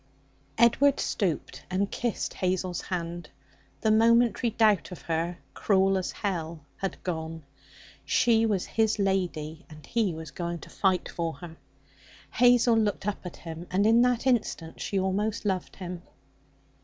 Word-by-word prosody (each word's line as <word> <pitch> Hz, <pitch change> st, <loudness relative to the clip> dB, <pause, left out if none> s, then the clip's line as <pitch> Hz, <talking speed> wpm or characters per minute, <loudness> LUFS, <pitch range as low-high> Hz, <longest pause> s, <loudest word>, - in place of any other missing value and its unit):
Edward 260 Hz, +4 st, +4 dB
stooped 185 Hz, -7 st, -2 dB
and 195 Hz, +2 st, 0 dB
kissed 240 Hz, -3 st, -2 dB
Hazel's 185 Hz, -1 st, -1 dB
hand. 170 Hz, -2 st, -4 dB, 0.5 s
The 220 Hz, -, +3 dB
momentary 230 Hz, +2 st, +4 dB
doubt 215 Hz, -4 st, +2 dB
of 180 Hz, -, -9 dB
her 170 Hz, +1 st, -2 dB, 0.2 s
cruel 195 Hz, -1 st, +2 dB
as 190 Hz, -1 st, -1 dB
hell 165 Hz, -6 st, -4 dB
had 195 Hz, -, -4 dB
gone. 160 Hz, -2 st, -4 dB, 0.6 s
She 235 Hz, -3 st, +3 dB
was 200 Hz, -4 st, 0 dB
his 220 Hz, -1 st, +1 dB
lady, 180 Hz, -5 st, -1 dB
and 155 Hz, -1 st, -13 dB
he 215 Hz, -8 st, 0 dB
was 160 Hz, -2 st, -8 dB
going 170 Hz, +1 st, -4 dB
to -, -, -12 dB
fight 190 Hz, -2 st, +1 dB
for 165 Hz, -1 st, -3 dB
her. 170 Hz, -1 st, -10 dB, 0.8 s
Hazel 245 Hz, 0 st, +5 dB
looked 205 Hz, -3 st, -1 dB
up 205 Hz, -, -3 dB
at 175 Hz, -, -8 dB
him, 165 Hz, +1 st, -8 dB
and 195 Hz, +3 st, +2 dB
in 230 Hz, +2 st, +5 dB
that 245 Hz, 0 st, +2 dB
instant 215 Hz, -10 st, 0 dB
she 200 Hz, -, -2 dB
almost 205 Hz, +4 st, -1 dB
loved 190 Hz, -3 st, -2 dB
him. 180 Hz, -2 st, -6 dB
190 Hz, 145 wpm, -27 LUFS, 170-220 Hz, 0.8 s, Hazel